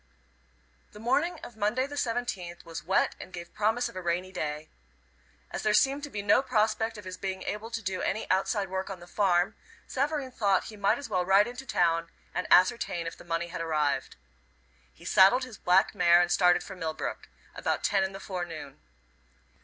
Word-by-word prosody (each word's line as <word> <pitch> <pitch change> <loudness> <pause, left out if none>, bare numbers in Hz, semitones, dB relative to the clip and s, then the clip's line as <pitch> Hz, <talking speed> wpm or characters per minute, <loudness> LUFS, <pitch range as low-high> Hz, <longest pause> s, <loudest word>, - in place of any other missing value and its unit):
The 210 - -11
morning 275 +10 +1
of 240 - -9
Monday, 220 +5 +1
the 285 - -9
17th, 230 -11 -3
was 165 -1 -7
wet 190 +4 +2
and - - -10
gave 175 -1 -9
promise 220 +3 +1
of - - -11
a 185 - -4
rainy 180 +2 -1
day. 155 -3 -4 0.8
As - - -4
there 215 -1 +2
seemed 275 +1 +3
to - - -9
be 205 -6 -5
no 205 +5 +5
prospect 220 -2 0
of 205 - -10
his 185 0 -6
being 190 0 -4
able 215 +2 -4
to 225 -1 -4
do 185 -1 -2
any 215 - -1
outside 195 +2 +1
work 190 +1 -3
on 190 -2 -6
the 175 - -12
farm, 180 -1 +1 0.3
Savareen 280 -1 -1
thought 200 -5 +2
he 215 - -9
might 205 +2 +2
as 285 - -7
well 185 -5 0
ride 195 +3 +5
into 245 +3 -8
town 165 -4 +1 0.2
and 180 - -2
ascertain 185 -3 +4
if 165 - -5
the - - -14
money 170 0 -2
had 170 - -5
arrived. 150 -4 0 0.8
He - - -17
saddled 195 +8 +6
his 250 -5 -9
black 180 +2 +3
mare, 175 -3 +5
and 175 0 +2
started 175 0 +4
for 190 - -9
Millbrook 160 -3 -4 0.2
about - - -2
ten 195 -2 +2
in 190 - -2
the 195 - -8
forenoon. 170 -7 -6
190 Hz, 195 wpm, -29 LUFS, 175-220 Hz, 0.8 s, saddled